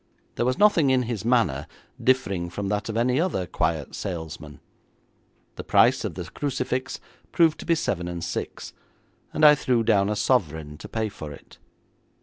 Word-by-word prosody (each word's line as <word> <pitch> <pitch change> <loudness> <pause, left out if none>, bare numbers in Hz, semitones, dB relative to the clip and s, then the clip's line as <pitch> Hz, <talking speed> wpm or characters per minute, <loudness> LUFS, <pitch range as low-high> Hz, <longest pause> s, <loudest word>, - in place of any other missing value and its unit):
There 120 - -1
was 130 - 0
nothing 190 -9 +4
in 130 -1 +3
his 115 -4 -4
manner 115 - +1 0.4
differing 100 -9 +1
from 100 +2 -4
that 105 +1 -2
of 110 - -3
any 125 +5 +2
other 160 - -1
quiet 80 -4 -2
salesman. 80 -4 -6 1.0
The - - -5
price - - +4
of - - -4
the - - -4
crucifix 130 -2 -3 0.3
proved 165 -2 +3
to - - -9
be 170 - +4
seven 90 - -2
and 85 -1 -5
six, - - -5 0.6
and 155 - +3
I 150 - +10
threw 125 -5 +1
down 100 -3 +3
a 105 - 0
sovereign 80 - 0
to - - -10
pay 110 -1 -1
for 75 -7 -8
it. 70 - -14
110 Hz, 170 wpm, -25 LUFS, 85-130 Hz, 1.0 s, I